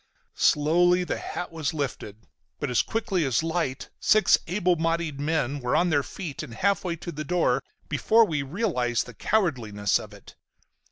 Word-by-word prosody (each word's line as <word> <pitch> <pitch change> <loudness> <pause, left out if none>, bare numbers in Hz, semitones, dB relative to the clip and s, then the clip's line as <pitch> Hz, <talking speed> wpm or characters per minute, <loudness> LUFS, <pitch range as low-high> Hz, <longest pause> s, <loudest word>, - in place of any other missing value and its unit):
Slowly 175 +4 +4
the - - -3
hat 175 - -5
was 160 -2 -3
lifted, 115 -6 -5 0.3
but 145 -3 -2
as 120 - +3
quickly 200 -6 -1
as 135 +1 +1
light 165 -5 -2
six 215 -4 +5
able 180 0 +1
bodied 165 -3 -1
men 145 -2 -1
were 125 -2 -1
on 175 0 +3
their 145 -2 +3
feet 150 +1 -6
and 130 -7 -8
half 200 +4 +1
way 175 -2 -2
to 170 +1 -7
the 155 -1 -5
door 155 -6 +1 0.3
before 220 +9 +4
we 150 -7 -1
realized 135 - -1
the 125 - -11
cowardliness 115 - 0
of - - -10
it. - - -14
160 Hz, 170 wpm, -26 LUFS, 135-180 Hz, 0.3 s, six